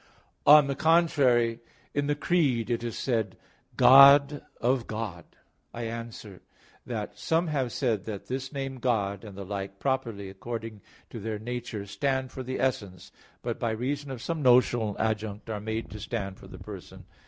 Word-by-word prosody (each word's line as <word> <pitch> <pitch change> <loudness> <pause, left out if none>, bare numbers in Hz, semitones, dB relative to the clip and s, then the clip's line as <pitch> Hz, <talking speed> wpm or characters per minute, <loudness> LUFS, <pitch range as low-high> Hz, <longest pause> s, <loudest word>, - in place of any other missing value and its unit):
On 150 0 +9
the 140 - -1
contrary, 135 -7 +3 0.3
In 145 0 0
the 145 - +1
Creed 140 -8 +1
it 115 0 -1
is 115 -2 -4
said, 110 -7 -1 0.4
"God 140 +2 +8 0.2
of 125 0 +1
God." 105 -7 -5 0.5
I 120 - -4
answer 115 -4 -7 0.5
that, - - -5
Some 165 +2 +1
have 135 -5 -1
said 110 -7 -1
that 105 -3 -6
this 130 +1 -4
name 135 -2 -4
"God" 100 -6 0
and 100 -3 -10
the 100 - -6
like, 100 0 -5
properly 115 -6 -2
according 110 +2 -7 0.3
to 115 - -6
their 110 +1 -3
nature, 115 -2 -5
stand 130 +5 -1
for 130 - -6
the 130 +1 -4
essence, 100 -7 -2 0.3
but - - -3
by 115 - 0
reason 135 +6 -3
of 130 -3 -6
some 165 -2 -2
notional 120 -4 +4
adjunct 110 0 -2
are 105 -1 -4
made 110 +1 -4
to 105 - -7
stand 100 -3 -4
for - - -13
the - - -11
Person. - - -10
115 Hz, 165 wpm, -28 LUFS, 105-135 Hz, 0.5 s, On